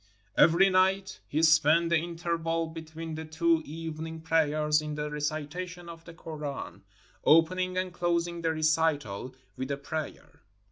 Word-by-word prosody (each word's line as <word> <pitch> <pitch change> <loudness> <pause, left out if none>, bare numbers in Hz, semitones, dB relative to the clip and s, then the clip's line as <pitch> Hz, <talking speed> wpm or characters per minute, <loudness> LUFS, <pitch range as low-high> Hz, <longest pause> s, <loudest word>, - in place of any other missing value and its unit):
Every 170 +4 +6
night 190 +1 +2
he 155 +2 0
spent 160 +1 +5
the - - +5
interval 165 0 -2
between 160 0 -7
the 160 0 -5
two 160 +1 +1
evening 160 +1 -6
prayers 155 -1 +2
in 150 -1 -5
the 150 0 -3
recitation 155 +4 -4
of 165 0 -11
the 170 - -11
Koran, 150 -4 -6 0.4
opening 185 +3 +3
and 185 -1 -2
closing 170 0 -1
the 165 -1 +1
recital 155 -7 0 0.2
with 130 +1 -5
a 140 - -1
prayer. 155 +2 -6
160 Hz, 140 wpm, -29 LUFS, 155-170 Hz, 0.4 s, Every